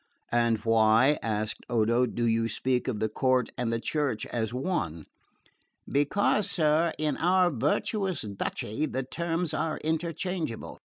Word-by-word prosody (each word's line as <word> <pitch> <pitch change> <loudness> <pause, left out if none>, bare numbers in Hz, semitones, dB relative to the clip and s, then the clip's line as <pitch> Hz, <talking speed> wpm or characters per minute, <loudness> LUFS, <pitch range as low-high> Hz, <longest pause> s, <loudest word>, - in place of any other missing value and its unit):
"And 115 -1 +3
why," 115 +5 +4
asked 110 -1 -2
Odo, 120 +2 +2
"do 120 0 -2
you 115 0 +1
speak 125 +3 0
of 115 -5 -2
the 110 - +1
court 130 +3 +1
and 120 -2 -1
the 115 - 0
Church 145 -3 -1
as 110 -2 -2
one?" 125 - -2 0.8
"Because, 185 +8 +2
sir, 160 0 +2
in 155 -1 -1
our 180 +1 +3
virtuous 180 - 0
duchy 105 +6 -3
the 135 -1 -2
terms 165 +3 -2
are 155 0 -1
interchangeable. 165 -3 -3
130 Hz, 135 wpm, -28 LUFS, 115-160 Hz, 0.8 s, why